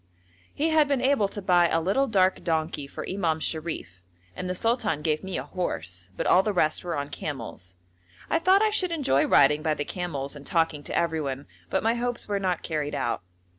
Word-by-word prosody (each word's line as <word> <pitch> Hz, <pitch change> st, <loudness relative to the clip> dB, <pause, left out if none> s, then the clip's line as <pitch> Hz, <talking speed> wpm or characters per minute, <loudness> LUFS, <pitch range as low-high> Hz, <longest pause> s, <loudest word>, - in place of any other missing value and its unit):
He 310 Hz, +3 st, 0 dB
had 310 Hz, -2 st, +4 dB
been 280 Hz, -2 st, +1 dB
able 260 Hz, -5 st, +3 dB
to 200 Hz, 0 st, -7 dB
buy 175 Hz, -2 st, +5 dB
a 165 Hz, -, +2 dB
little 200 Hz, +12 st, +1 dB
dark 190 Hz, -5 st, +2 dB
donkey 160 Hz, -3 st, -1 dB
for -, -, -7 dB
Imam 170 Hz, -5 st, 0 dB
Sharif 155 Hz, -, -3 dB, 0.3 s
and 180 Hz, -, -4 dB
the 180 Hz, -, -1 dB
sultan 225 Hz, -, 0 dB
gave 155 Hz, 0 st, 0 dB
me 190 Hz, -1 st, -3 dB
a -, -, -3 dB
horse, 90 Hz, -, -4 dB
but -, -, -2 dB
all 185 Hz, -, +6 dB
the 210 Hz, -, -1 dB
rest 155 Hz, -4 st, +1 dB
were 170 Hz, -3 st, -3 dB
on 145 Hz, 0 st, -3 dB
camels. 115 Hz, -, -6 dB, 0.5 s
I 330 Hz, -, +2 dB
thought 375 Hz, +5 st, +5 dB
I 430 Hz, -, +3 dB
should 370 Hz, -4 st, 0 dB
enjoy 275 Hz, -, +2 dB
riding 150 Hz, +2 st, +5 dB
by 155 Hz, -1 st, +1 dB
the 145 Hz, -, -3 dB
camels 150 Hz, -6 st, -4 dB
and 145 Hz, -, -10 dB
talking 160 Hz, -1 st, 0 dB
to -, -, -2 dB
everyone, 150 Hz, -5 st, -1 dB, 0.2 s
but 190 Hz, -, 0 dB
my 225 Hz, +1 st, +3 dB
hopes 240 Hz, 0 st, -2 dB
were 205 Hz, -1 st, 0 dB
not 185 Hz, -3 st, -1 dB
carried 150 Hz, -3 st, -2 dB
out. 120 Hz, -, -1 dB
170 Hz, 210 wpm, -26 LUFS, 150-210 Hz, 0.5 s, all